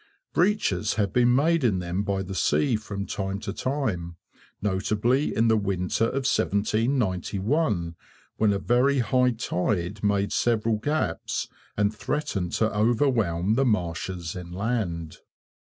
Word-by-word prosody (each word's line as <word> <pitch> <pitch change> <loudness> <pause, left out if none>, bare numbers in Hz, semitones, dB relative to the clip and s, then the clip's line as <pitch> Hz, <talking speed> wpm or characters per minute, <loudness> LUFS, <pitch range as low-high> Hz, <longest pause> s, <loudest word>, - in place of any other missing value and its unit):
Breaches 140 - +1
have 100 -3 0
been 125 0 +4
made 160 +3 +3
in 110 -6 +3
them 90 +1 -2
by 100 -1 -1
the 95 +1 -6
sea, 125 +6 +2
from 105 -2 -4
time 95 -1 -3
to 100 -2 -4
time, 110 -12 -2 0.4
notably 105 +7 0
in 115 +1 +3
the 110 - +4
winter 100 0 0
of 135 +3 -2
1791, 105 - 0 0.4
when 110 -1 +3
a 100 - +1
very 125 +7 +2
high 125 0 +3
tide 100 -3 -2
made 100 -1 +1
several 115 -2 +1
gaps, 145 +8 -2 0.3
and 105 +1 +2
threatened 105 - -2
to 110 -1 +1
overwhelm 110 -5 +2
the 135 - +2
marshes 90 -5 -2
inland. 90 -2 -3
105 Hz, 130 wpm, -26 LUFS, 95-125 Hz, 0.4 s, been